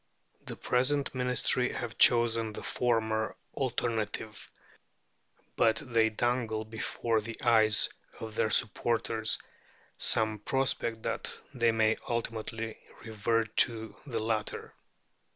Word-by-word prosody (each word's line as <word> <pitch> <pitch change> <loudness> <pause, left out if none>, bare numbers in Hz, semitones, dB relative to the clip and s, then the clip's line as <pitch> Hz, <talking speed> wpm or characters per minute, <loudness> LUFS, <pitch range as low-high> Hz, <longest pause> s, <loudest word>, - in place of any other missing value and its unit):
The - - -5
present 135 +3 +1
Ministry 125 0 +2
have 120 -2 -5
chosen 115 -2 +4
the - - -7
former 110 -2 0 0.2
alternative, 110 -5 -3 1.1
but 110 -1 +4
they 115 -2 +1
dangle 110 -1 -1
before 110 +1 -1
the 115 +1 -7
eyes 110 -3 +4 0.3
of 110 -1 -7
their 110 0 +1
supporters 110 +1 +1 0.6
some 110 -1 +2
prospect 115 -2 -1
that 115 0 -3
they 120 -3 +3
may 110 -1 +2
ultimately 115 -1 -3 0.2
revert 110 0 -1
to 115 -4 +2
the 115 -4 -2
latter. 110 -1 -3
115 Hz, 105 wpm, -30 LUFS, 110-120 Hz, 1.1 s, chosen